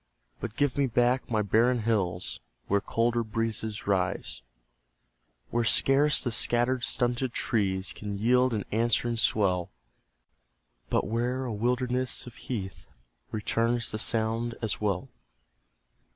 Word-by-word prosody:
But 115 -2 -6
give 145 -1 0
me 140 - +3
back 125 +2 +1
my 110 -2 +1
barren 115 +4 +3
hills 95 -6 -1 0.3
Where 100 0 +1
colder 115 +2 0
breezes 110 -1 -3
rise; 95 -10 -1 1.1
Where 120 0 +1
scarce 140 +5 +4
the 120 - -1
scattered, 120 +2 +1
stunted 120 0 +1
trees 95 -4 0
Can 100 -1 -5
yield 125 +3 +3
an 105 - -3
answering 115 +1 +1
swell, 95 -6 +1 1.2
But - - +1
where 120 +4 -1
a 120 - -3
wilderness 125 +3 -1
of 125 - -10
heath 100 -8 -6 0.4
Returns 115 +2 0
the 110 - -3
sound 115 +1 0
as 110 -2 -2
well. 100 -4 -1
115 Hz, 125 wpm, -28 LUFS, 105-120 Hz, 1.2 s, scarce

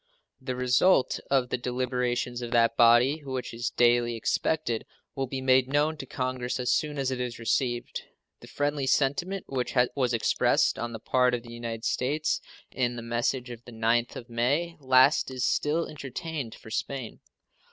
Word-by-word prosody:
The 130 -1 -4
result 125 +5 +3
of 130 -3 +2
the 125 - -1
deliberations 125 -1 -2
of 120 - -4
that 115 -1 +3
body, 120 +6 +5
which 130 -3 -5
is 115 +1 -2
daily 120 -1 +3
expected, 115 +2 -1 0.3
will 135 -1 -2
be 130 +1 -4
made 130 -1 +4
known 145 +3 +1
to 135 - -8
Congress 130 -1 -3
as 125 - 0
soon 150 -1 0
as 135 -1 -1
it 125 -1 -2
is 125 -1 -4
received. 120 +1 -1 0.4
The - - -13
friendly 145 -1 -1
sentiment 175 +9 0
which 130 -1 -3 0.2
was 125 -3 0
expressed 115 - +2
on 120 0 -3
the 110 - -6
part 125 +2 +2
of 120 - -6
the 120 -1 -11
United 115 -1 -5
States 150 +5 0 0.3
in 120 -2 -1
the 120 - -6
message 120 +2 -1
of 120 0 -9
the 120 - -11
9th 115 +1 0
of 120 - -8
May 140 +9 0
last 130 +1 +4
is 130 -1 -2
still 155 +3 +1
entertained 145 -2 -6
for 110 - -13
Spain. 130 -1 -4
125 Hz, 175 wpm, -27 LUFS, 120-135 Hz, 0.4 s, body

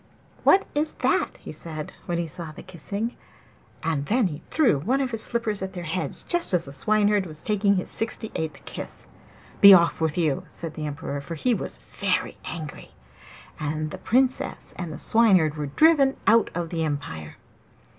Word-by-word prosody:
'What 390 - +5
is 300 +1 0
that?' - - 0
he - - -9
said, 155 -2 -7
when 175 - -1
he 170 - -1
saw 165 0 -7
the 155 - -11
kissing; 200 +6 -5 0.7
and 155 -3 -1
then 240 0 +3
he 150 -5 -3
threw 250 - +3
one 245 - 0
of 265 -2 -1
his 225 -1 -1
slippers 225 -4 -1
at 190 0 -4
their 175 - -6
heads 170 +3 -3
just 345 - +3
as 175 - 0
the 140 - -8
Swineherd 205 +4 +2
was 155 -1 -9
taking 205 -1 +2
his 185 - 0 0.2
eighty 225 - -1
sixth 160 -9 -5
kiss. - - -6 0.6
'Be 200 -1 +11
off 170 -2 +3
with 160 +1 0
you!' 155 -6 +1
said 165 -2 -7
the 155 -1 -4
Emperor, 145 -1 -4
for 165 +4 -6
he 240 +10 +1
was - - -4
very - - -2
angry. 155 -3 -7 0.6
And 155 +1 -2
the - - -7
Princess 255 +2 0
and 175 -3 -5
the 150 - -6
Swineherd 190 -10 +4
were 150 -1 -3
driven 280 - +4
out 230 -1 +5
of 170 -1 -3
the 165 -2 -1
empire. 140 - -4
175 Hz, 185 wpm, -25 LUFS, 155-220 Hz, 0.7 s, Be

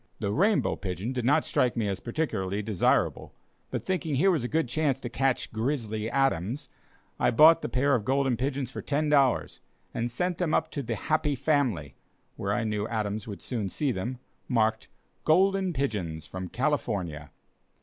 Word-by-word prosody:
The 100 - -2
"rainbow 200 - +2
pigeon" 95 +5 -4
did 125 -2 -2
not 140 - +3
strike 125 -1 +1
me 110 -3 +1
as 95 -2 -2
particularly 105 -7 -2
desirable; 105 -4 +1 0.3
but - - -4
thinking 165 -6 -1
here 190 +8 +4
was 155 -8 0
a - - -1
good 160 0 0
chance 140 0 0
to 120 - -5
catch 135 0 0
"Grizzly 110 -2 -2
Adams," 135 - 0 0.5
I - - +3
bought 160 +6 +7
the - - -3
pair 140 +3 +2
of 120 -5 +2
golden 135 +1 +1
pigeons 130 +1 -2
for - - -6
ten 150 +1 0
dollars, 135 -4 +2 0.3
and 120 +1 -1
sent 175 +9 -2
them 175 -4 +1
up - - 0
to 145 - -3
the 115 -3 -3
"Happy 155 +4 0
Family" 120 - 0 0.4
(where 100 - -2
I 110 +3 0
knew 105 -1 -1
Adams 105 -2 -2
would 100 -3 -7
soon 110 -6 -2
see 140 +7 0
them), 120 +5 -3 0.3
marked, 110 -3 +1 0.4
"Golden 190 +3 +3
Pigeons, 100 - -2
from 95 +2 -6
California." 100 - -2
125 Hz, 175 wpm, -28 LUFS, 105-145 Hz, 0.5 s, bought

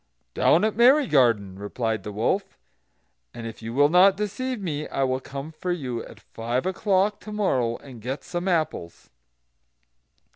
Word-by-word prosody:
"Down 170 - +4
at 220 - 0
Merry 260 +6 +6
garden," 115 - +2
replied 110 +1 -2
the 105 - -7
wolf, 115 - -1 0.8
"and 115 - -7
if 115 0 -8
you 115 0 -5
will 145 +4 +4
not 180 +4 +5
deceive 215 +5 -3
me 155 -6 -3
I 135 - -1
will 130 0 0
come 140 +3 -7
for 180 +3 -4
you, 130 -9 -3
at 110 - -13
five 120 +5 -3
o'clock 195 +2 +1
to 215 - -10
morrow, 130 - 0
and 125 -5 -13
get 130 +5 -4
some 175 +1 -4
apples." 155 - -2
145 Hz, 160 wpm, -25 LUFS, 115-190 Hz, 0.8 s, Merry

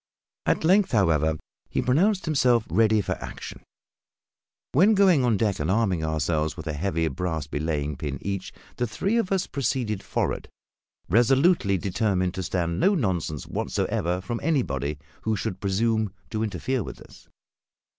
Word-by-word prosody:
At - - +2
length, 190 +2 +4
however, 80 -7 +3 0.3
he - - -1
pronounced 185 +10 +2
himself 125 -7 +3
ready 110 +3 +4
for 95 - -4
action; - - -8 1.1
when, 195 +10 +5
going 185 -8 +5
on 120 -4 +2
deck, 105 -2 0
and 75 +3 -1
arming 95 -5 +1
ourselves 80 0 -1
with - - -7
a 80 - -2
heavy 80 +1 0
brass 80 +1 -2
belaying 75 -1 -2
pin 70 -2 -4
each, 100 -1 -4 0.3
the 120 - 0
three 195 - 0
of 210 -5 0
us 190 -2 +1
proceeded 120 -6 -1
forward, - - -2 0.6
resolutely 120 - +3
determined 95 -1 0
to 95 - -4
stand 85 -1 -1
no 200 +1 +4
nonsense 90 - -1
whatever 90 +2 -1
from 115 +5 -4
anybody 75 - 0 0.2
who 110 0 0
should 95 -1 -4
presume 110 +1 +1 0.2
to 110 -2 -2
interfere 120 +4 -1
with - - -7
us. - - -16
100 Hz, 150 wpm, -25 LUFS, 85-125 Hz, 1.1 s, when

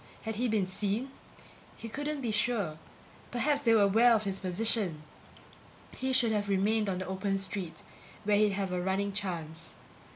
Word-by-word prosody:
Had 220 -2 -4
he 245 +2 +1
been 215 -4 +1
seen? 205 +7 -2 0.7
He 230 - -7
couldn't 290 +4 -3
be 235 -4 -1
sure. 210 -7 0 0.5
Perhaps 285 +4 +2
they 230 -4 +4
were 210 - +5
aware 225 +4 +5
of 215 - 0
his 195 -2 -2
position! 185 -3 +1 0.9
He 260 0 -1
should 250 -3 +3
have 205 -1 -1
remained 205 +2 +2
on 185 - -1
the 185 - -4
open 195 +1 -1
street 190 -3 -4 0.4
where 210 0 +3
he'd 210 -1 +3
have 195 -1 -2
a 180 0 -1
running 195 +2 -1
chance. 170 -5 -4
205 Hz, 170 wpm, -30 LUFS, 190-230 Hz, 0.9 s, were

